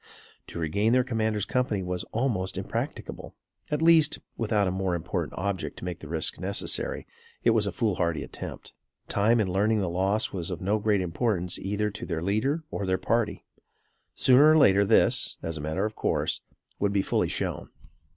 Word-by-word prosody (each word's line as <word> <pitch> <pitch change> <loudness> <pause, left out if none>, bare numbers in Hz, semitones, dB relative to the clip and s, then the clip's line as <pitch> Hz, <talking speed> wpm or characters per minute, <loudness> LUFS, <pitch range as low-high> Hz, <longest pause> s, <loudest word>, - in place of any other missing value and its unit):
To - - -8
regain 100 +8 +1
their 130 0 +4
commander's 110 -4 -1
company 115 -7 0
was 90 0 -3
almost 110 -6 -1
impracticable; - - -5 0.3
at 150 +1 -1
least, 160 -2 +5 0.2
without 105 -3 +1
a - - 0
more 95 -1 -1
important 85 - -3
object 95 -1 -3
to - - -7
make 90 -2 -4
the 80 - -10
risk 80 +1 0
necessary, - - -1 0.4
it 115 - +5
was 110 -2 +2
a - - -1
foolhardy 90 -8 0
attempt. - - -8 0.3
Time 110 +4 +3
in 105 - +1
learning 105 +3 +2
the 95 - 0
loss 100 +5 0
was 90 -3 -3
of 90 -2 -4
no 100 +4 0
great 105 -2 +2
importance 90 0 -1
either 105 +2 -1
to 105 - -7
their 80 -2 -3
leader 125 - 0
or 100 - -3
their 95 0 +2
party. 115 +3 -1 0.7
Sooner 135 +4 +6
or 155 - +6
later 100 -8 +5
this, 105 +3 +3
as 80 -1 -3
a 75 - -5
matter 80 +7 -1
of 110 0 -4
course, - - -1 0.4
would 100 0 +1
be 100 -1 +2
fully - - 0
shown. - - -3
100 Hz, 180 wpm, -27 LUFS, 90-115 Hz, 0.7 s, Sooner